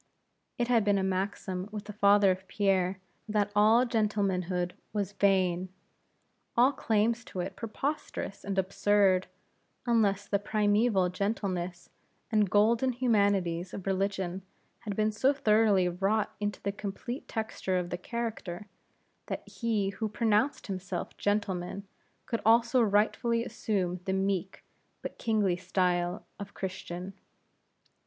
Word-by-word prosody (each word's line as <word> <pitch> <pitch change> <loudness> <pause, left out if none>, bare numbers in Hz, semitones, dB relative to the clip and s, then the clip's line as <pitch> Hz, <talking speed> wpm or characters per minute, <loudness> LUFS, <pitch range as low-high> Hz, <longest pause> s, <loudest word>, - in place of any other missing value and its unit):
It 240 - 0
had 235 -3 +3
been 205 -1 +3
a 190 - 0
maxim 190 0 -2
with 210 -1 -6
the 210 - -7
father 200 -1 +5
of 190 +1 -4
Pierre, 190 -2 +1 0.3
that 205 -1 +1
all 220 +4 +5
gentlemanhood 190 -6 0 0.2
was 205 -2 -1
vain; 185 -3 +2 0.9
all 250 +3 +6
claims 230 -2 +1
to 185 - -7
it 185 +2 -3
preposterous 235 -2 -4
and 200 -1 -3
absurd, 190 0 +3 0.6
unless 205 -4 +2
the 200 - +1
primeval 205 -2 +2
gentleness 185 -2 -3 0.4
and 210 -3 +3
golden 230 +6 +3
humanities 200 -7 +1
of 195 - -7
religion 195 -1 -1 0.4
had 210 -4 -5
been 215 +1 +2
so 260 +6 +2
thoroughly 215 -7 +3
wrought 195 +4 0
into 205 -2 -2
the 200 - 0
complete 210 +6 -6
texture 220 -4 -2
of 180 0 -3
the 175 - -2
character, 215 -3 -4 0.6
that - - -5
he 220 -4 -1
who 215 +2 -3
pronounced 220 +5 +1
himself 185 -2 -5
gentleman, 200 -2 -2 0.4
could 230 - -2
also 235 +3 +4
rightfully 230 +2 +2
assume 185 -7 -2
the 190 - 0
meek, 190 -1 -1 0.4
but - - -6
kingly 210 -6 +1
style 180 -1 0
of 200 0 -8
Christian. 185 0 -5
200 Hz, 130 wpm, -30 LUFS, 185-220 Hz, 0.9 s, all